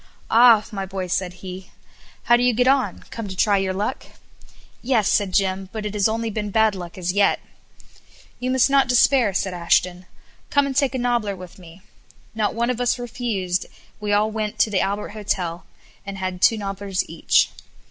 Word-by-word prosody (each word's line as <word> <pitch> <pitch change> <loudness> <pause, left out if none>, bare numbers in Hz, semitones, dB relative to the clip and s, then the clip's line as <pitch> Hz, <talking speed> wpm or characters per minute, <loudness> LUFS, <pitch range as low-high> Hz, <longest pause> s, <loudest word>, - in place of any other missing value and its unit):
"Ah! 230 -2 +6
my 195 -2 -4
boy," 190 0 -4
said 180 0 -2
he, 185 0 -8 0.5
"how 240 - +5
do 240 - +1
you 245 -2 +2
get 245 +2 +2
on? 270 0 +1
Come 230 -2 -5
to 190 - -6
try 205 +1 +3
your 190 -1 -1
luck?" 205 +7 -3 0.7
"Yes," 235 -5 +1
said 200 -3 +1
Jim, 190 0 0
"but 215 -1 -5
it 210 - -4
has 210 0 +2
only 225 0 -2
been 210 0 -3
bad 220 +1 +3
luck 175 -2 -8
as 180 0 -2
yet." 200 0 +3 1.0
"You 250 - -2
must 260 -1 +4
not 275 -2 +3
despair." 250 -2 +4
said 190 0 -2
Ashton. 180 +1 0 0.4
"Come 285 -1 +3
and 275 -1 -4
take 275 -1 +1
a - - 0
nobbler 240 -5 0
with 185 +1 -12
me." 175 +1 -15 0.5
Not 215 -1 -1
one 235 +2 0
of 250 0 -4
us 245 0 +1
refused, 220 -7 -3 0.3
we 210 -1 -3
all 210 +1 +2
went 215 0 -3
to 215 - +2
the 190 - +1
Albert 200 +1 -2
Hotel, 190 -5 -3 0.4
and 200 0 -7
had 185 -1 -4
two 225 - +5
nobblers 195 -1 -3
each. - - +2
210 Hz, 190 wpm, -22 LUFS, 190-235 Hz, 1.0 s, Ah